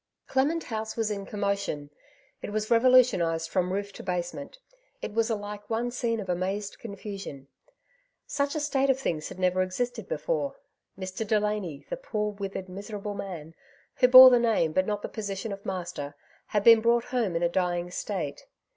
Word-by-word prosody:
Clement 295 Hz, +5 st, +1 dB
House 220 Hz, -1 st, -4 dB
was 220 Hz, -2 st, 0 dB
in 200 Hz, -1 st, -4 dB
commotion 200 Hz, -8 st, -2 dB, 0.2 s
\ -, -, -35 dB
it -, -, -5 dB
was 215 Hz, +1 st, -2 dB
revolu 255 Hz, +2 st, +7 dB
tionized 165 Hz, -9 st, -1 dB
from 185 Hz, -1 st, 0 dB
roof 200 Hz, +1 st, -3 dB
to -, -, -9 dB
basement; 180 Hz, -, -4 dB, 0.4 s
it 205 Hz, -, -6 dB
was 225 Hz, +1 st, +1 dB
alike 205 Hz, -1 st, -5 dB
one 235 Hz, +2 st, -1 dB
scene 235 Hz, -2 st, -1 dB
of 200 Hz, -, -5 dB
amazed 190 Hz, +3 st, -2 dB
confnsion. 200 Hz, -, -7 dB, 0.8 s
Snch 285 Hz, 0 st, -1 dB
a -, -, 0 dB
state 275 Hz, -2 st, +1 dB
of 265 Hz, 0 st, +3 dB
things 160 Hz, -12 st, -2 dB
had -, -, -9 dB
never 185 Hz, 0 st, +2 dB
existed 225 Hz, +4 st, -2 dB
beforei 150 Hz, -1 st, -1 dB, 0.4 s
Mr. 190 Hz, +3 st, -4 dB
Delany, 210 Hz, -7 st, -1 dB
tlie -, -, -5 dB
poor 210 Hz, -, -2 dB
withered, 195 Hz, -2 st, -5 dB
miserable 205 Hz, +2 st, -6 dB
man, 180 Hz, -6 st, -7 dB, 0.4 s
who 250 Hz, -, +6 dB
bore 255 Hz, 0 st, +11 dB
the 245 Hz, -, +5 dB
name 225 Hz, -9 st, +2 dB
but 185 Hz, +2 st, +2 dB
not 210 Hz, -1 st, -2 dB
the -, -, -2 dB
position 205 Hz, 0 st, -4 dB
of 200 Hz, 0 st, -7 dB
master, 175 Hz, -6 st, -4 dB, 0.3 s
had 210 Hz, -1 st, 0 dB
been 230 Hz, 0 st, +8 dB
brought 235 Hz, +1 st, +3 dB
home 225 Hz, -9 st, +1 dB
in 165 Hz, -, 0 dB
a -, -, +5 dB
dying 175 Hz, 0 st, -1 dB
state. -, -, -4 dB
205 Hz, 180 wpm, -28 LUFS, 185-230 Hz, 0.8 s, bore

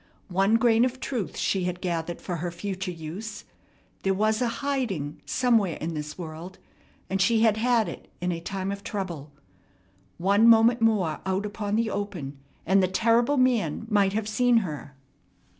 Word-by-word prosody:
One 195 Hz, +4 st, +3 dB
grain 230 Hz, 0 st, +4 dB
of 255 Hz, 0 st, -1 dB
truth 240 Hz, -9 st, -4 dB
she 190 Hz, -2 st, 0 dB
had 180 Hz, 0 st, -3 dB
gathered 170 Hz, -2 st, -3 dB
for 175 Hz, -2 st, -3 dB
her 175 Hz, +2 st, -3 dB
future 190 Hz, +2 st, -4 dB
use. 185 Hz, +6 st, -7 dB, 0.6 s
There 195 Hz, 0 st, +1 dB
was 215 Hz, +3 st, +1 dB
a 245 Hz, -, +2 dB, 0.2 s
"hiding" 215 Hz, -, -2 dB
somewhere 225 Hz, -9 st, +2 dB
in 165 Hz, +1 st, -4 dB
this 150 Hz, -1 st, -5 dB
world, 170 Hz, +2 st, -8 dB, 0.5 s
and 195 Hz, 0 st, -1 dB
she 225 Hz, +3 st, +3 dB
had 220 Hz, -2 st, +4 dB
had 230 Hz, -2 st, +2 dB
it 170 Hz, -, -8 dB
in 180 Hz, 0 st, -1 dB
a 170 Hz, -, -3 dB
time 190 Hz, +2 st, -3 dB
of 200 Hz, 0 st, -6 dB
trouble. 170 Hz, -9 st, -5 dB, 0.9 s
One 200 Hz, +5 st, +4 dB
moment 230 Hz, +1 st, +6 dB
more 205 Hz, -9 st, +2 dB
out 190 Hz, +2 st, -1 dB
upon 205 Hz, 0 st, -3 dB
the 225 Hz, -1 st, +1 dB
open, 170 Hz, -10 st, -5 dB, 0.3 s
and 195 Hz, +3 st, +4 dB
the 185 Hz, -, +3 dB
terrible 230 Hz, +8 st, +2 dB
man 230 Hz, -, +1 dB
might 200 Hz, -2 st, +3 dB
have 215 Hz, 0 st, -1 dB
seen 245 Hz, +2 st, +3 dB
her. 145 Hz, -3 st, -7 dB
195 Hz, 170 wpm, -26 LUFS, 175-225 Hz, 0.9 s, moment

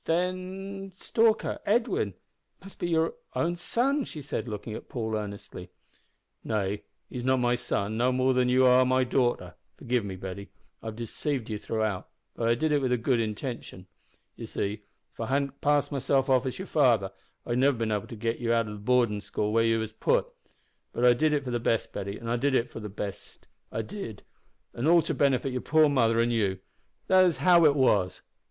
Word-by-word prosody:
"Then 185 Hz, +3 st, -2 dB
Stalker 225 Hz, +3 st, +1 dB
Edwin 210 Hz, -, +1 dB, 0.4 s
must 195 Hz, +1 st, -14 dB
be 175 Hz, -, -2 dB
your 160 Hz, -1 st, +1 dB, 0.2 s
own 170 Hz, +1 st, 0 dB
son!" 265 Hz, +11 st, 0 dB
she 155 Hz, -, -8 dB
said, 135 Hz, -, -4 dB
looking 105 Hz, 0 st, -5 dB
at -, -, -8 dB
Paul 110 Hz, -3 st, -3 dB
earnestly. 100 Hz, -3 st, -6 dB, 0.7 s
"Nay, 105 Hz, -2 st, -1 dB, 0.3 s
he's 125 Hz, -, -6 dB
not 130 Hz, +1 st, +3 dB
my 120 Hz, -1 st, +2 dB
son, 110 Hz, -3 st, -2 dB
no 125 Hz, +2 st, +2 dB
more 130 Hz, +1 st, +2 dB
than 125 Hz, -1 st, +2 dB
you 130 Hz, +1 st, +4 dB
are 125 Hz, 0 st, +6 dB
my 130 Hz, 0 st, +2 dB
daughter. 125 Hz, -1 st, 0 dB, 0.2 s
Forgive 120 Hz, -1 st, -1 dB
me, 95 Hz, -2 st, -5 dB
Betty. 95 Hz, +1 st, -7 dB, 0.3 s
I've 110 Hz, -1 st, -6 dB
deceived 120 Hz, +2 st, -3 dB
you 105 Hz, -, -3 dB
throughout, 110 Hz, -4 st, -2 dB, 0.3 s
but 115 Hz, -1 st, 0 dB
I 115 Hz, -, +4 dB
did 155 Hz, +6 st, 0 dB
it 145 Hz, -1 st, +3 dB
with 130 Hz, -2 st, 0 dB
a 125 Hz, -, +3 dB
good 120 Hz, +1 st, +1 dB
intention. 110 Hz, -3 st, -4 dB, 0.5 s
You -, -, -8 dB
see, 105 Hz, +2 st, -3 dB, 0.3 s
if -, -, -32 dB
I 115 Hz, -, -2 dB
hadn't 140 Hz, +1 st, -1 dB
passed 145 Hz, 0 st, +2 dB
myself 135 Hz, -1 st, +1 dB
off 130 Hz, 0 st, +3 dB
as 130 Hz, -, -4 dB
your 190 Hz, -, -5 dB
father, 120 Hz, -, +3 dB, 0.3 s
I'd 120 Hz, +1 st, -1 dB
never 140 Hz, +2 st, +4 dB
have -, -, -7 dB
bin 115 Hz, -1 st, -1 dB
able 105 Hz, -2 st, -2 dB
to 115 Hz, -, -8 dB
git 115 Hz, +1 st, -2 dB
ye 115 Hz, -1 st, -1 dB
out 115 Hz, -1 st, +2 dB
o' -, -, -6 dB
the 105 Hz, -, -8 dB
boardin' 115 Hz, -2 st, +2 dB
school 105 Hz, +1 st, -2 dB
where 115 Hz, 0 st, +4 dB
ye 115 Hz, 0 st, +3 dB
was 110 Hz, -1 st, -3 dB
putt. 485 Hz, -, +1 dB, 0.7 s
But 120 Hz, -, +1 dB
I 125 Hz, -, +7 dB
did 155 Hz, +5 st, +2 dB
it 145 Hz, -1 st, +1 dB
for 125 Hz, -, -4 dB
the 120 Hz, -, 0 dB
best, 115 Hz, -1 st, 0 dB
Betty, 100 Hz, +1 st, -5 dB
I 115 Hz, +1 st, -2 dB
did 135 Hz, +2 st, +1 dB
it 120 Hz, -1 st, +1 dB
for -, -, -7 dB
the 105 Hz, -1 st, -6 dB
best; 100 Hz, -1 st, -7 dB, 0.3 s
an' 110 Hz, -1 st, -5 dB, 0.9 s
all 170 Hz, 0 st, +6 dB
to -, -, -2 dB
benefit 135 Hz, -1 st, +1 dB
your 125 Hz, -, -2 dB
poor 155 Hz, 0 st, +4 dB
mother 115 Hz, -5 st, +3 dB
an' 120 Hz, +1 st, +2 dB
you. 100 Hz, -5 st, +1 dB, 0.5 s
That 185 Hz, 0 st, +5 dB
is 175 Hz, -3 st, +2 dB
how 175 Hz, -2 st, +5 dB
it 145 Hz, -2 st, +5 dB
was." 105 Hz, -9 st, +2 dB
125 Hz, 205 wpm, -28 LUFS, 110-145 Hz, 0.9 s, I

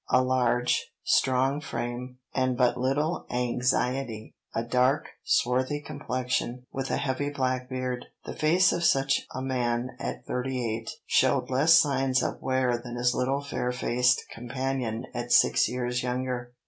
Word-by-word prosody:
A 130 Hz, -, +4 dB
large, 125 Hz, -1 st, +1 dB
strong 135 Hz, +2 st, +2 dB
frame, 125 Hz, -2 st, -5 dB, 0.2 s
and 130 Hz, -1 st, +1 dB
but 125 Hz, -1 st, +3 dB
little 145 Hz, +7 st, -1 dB
anxiety; 125 Hz, -1 st, -1 dB, 0.2 s
a 115 Hz, -, -2 dB
dark, 125 Hz, +4 st, +1 dB
swarthy 130 Hz, +4 st, +1 dB
complexion, 125 Hz, -3 st, -3 dB
with 135 Hz, 0 st, -3 dB
a -, -, 0 dB
heavy 145 Hz, +1 st, -1 dB
black 130 Hz, -2 st, -1 dB
beard; 130 Hz, -1 st, -3 dB, 0.2 s
the -, -, -6 dB
face 170 Hz, +5 st, +4 dB
of 175 Hz, -, -1 dB
such 135 Hz, -3 st, +3 dB
a 130 Hz, -, -3 dB
man 125 Hz, -1 st, -1 dB
at 65 Hz, 0 st, -5 dB
thirty 130 Hz, +1 st, -2 dB, 0.2 s
eight 115 Hz, -, -7 dB, 0.2 s
showed -, -, +2 dB
less 150 Hz, +6 st, +5 dB
signs 135 Hz, -3 st, +3 dB
of -, -, -3 dB
wear 130 Hz, -2 st, +1 dB
than 120 Hz, 0 st, -8 dB
his 125 Hz, +1 st, +2 dB
little 135 Hz, +3 st, 0 dB
fair 125 Hz, -3 st, -2 dB
faced 125 Hz, 0 st, +2 dB
companion 125 Hz, -1 st, -3 dB
at 120 Hz, 0 st, -4 dB
six -, -, +5 dB
years 125 Hz, 0 st, -2 dB
younger. 125 Hz, -1 st, -3 dB
125 Hz, 145 wpm, -27 LUFS, 125-135 Hz, 0.2 s, less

